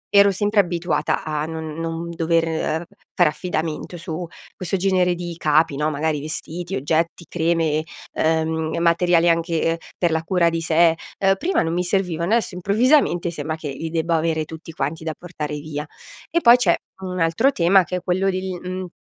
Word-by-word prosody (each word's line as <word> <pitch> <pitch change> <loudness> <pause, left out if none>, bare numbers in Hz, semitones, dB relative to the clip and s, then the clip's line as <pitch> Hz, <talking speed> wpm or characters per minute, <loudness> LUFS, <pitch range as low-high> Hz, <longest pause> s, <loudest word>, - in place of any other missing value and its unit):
ero 200 0 +8
sempre 205 +2 +1
abituata 170 -4 0
a 155 -1 -2
non 160 -1 -5
non 165 +1 -4
dover 165 0 0 0.3
fare 175 -4 +5
affidamento, 160 0 -4
su 170 0 -5 0.3
questo 185 +1 -2
genere 180 -1 +2
di 175 -1 -6
capi 155 -2 +2
no, 150 +2 0
magari 150 0 -1
vestiti, 165 +4 -5
oggetti, 160 +4 -1
creme, 165 -2 +1 0.3
uhm, 160 0 0
materiali 170 0 +3
anche 165 0 +1 0.2
per 175 -2 +1
la 160 0 +1
cura 170 -1 +2
di 165 0 -2
sé, 165 +1 +4 0.2
uhm, 195 0 +4
prima 375 - +1
non 165 +1 -1
mi 180 +1 0
servivano, 180 -1 -1
adesso 230 -4 +1
improvvisamente 200 - +2
sembra 155 0 -4
che 155 -2 -6
li 160 +4 -5
debba 165 0 0
avere 160 -1 0
tutti 160 +1 -10
quanti 155 +2 -3
da 160 -1 -3
portare 155 -4 -5
via. 150 0 -5 0.4
E 340 - +1
poi 235 +1 +8
c'è 185 -9 +3 0.3
un 185 -1 -4
altro 165 +12 +3
tema, 185 -1 +4
che 180 +3 -4
è - - -5
quello 185 +2 +1
del 185 -1 -3
uhm, 185 0 -5
170 Hz, 175 wpm, -22 LUFS, 160-180 Hz, 0.4 s, ero